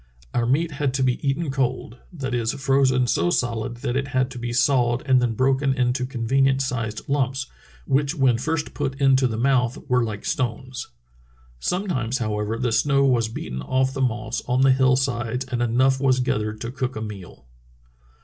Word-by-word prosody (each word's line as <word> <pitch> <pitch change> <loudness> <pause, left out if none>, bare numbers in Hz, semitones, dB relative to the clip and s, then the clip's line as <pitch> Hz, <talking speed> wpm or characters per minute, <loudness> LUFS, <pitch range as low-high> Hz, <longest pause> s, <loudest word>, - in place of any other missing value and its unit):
Our 120 -1 +1
meat 160 +6 +1
had 140 -2 -1
to 135 - +1
be 125 -1 +1
eaten 140 +2 -1
cold 125 -2 -2
— - - -29
that 130 -1 -2
is, 115 -1 0
frozen 135 -2 +2
so 85 -7 +1
solid 120 +3 -1
that 120 - -1
it 135 0 -1
had 130 0 0
to 125 - -7
be 120 0 -3
sawed 120 0 +2
and 130 -2 +4
then 120 -2 0
broken 135 +1 +2
into 125 0 0
conven 135 +1 +1
ient 135 0 +1
sized 115 -4 -3
lumps, 135 -1 0 0.4
which 140 +3 +1
when 130 -6 +3
first 155 +3 -2
put 135 -1 -3
into 135 -1 +4
the 110 -2 -3
mouth 125 -1 +2
were 125 -2 +2
like 110 -3 -5
stones. 130 0 -3 0.7
Sometimes, 130 - -1
however, 110 -1 -2
the 120 0 -1
snow 140 +3 +3
was 120 -4 +2
beaten 65 - -6
off 130 - 0
the 135 - -3
moss 110 -4 -1
on 125 +1 +1
the 135 0 +6
hill 130 0 +4
sides 125 -1 -1
and 125 -2 -3
enough 130 +3 +2
was 130 -2 +3
gathered 110 -3 -1
to 115 - -4
cook 130 0 -3
a 110 - -4
meal." 95 - -9
130 Hz, 190 wpm, -23 LUFS, 120-135 Hz, 0.7 s, the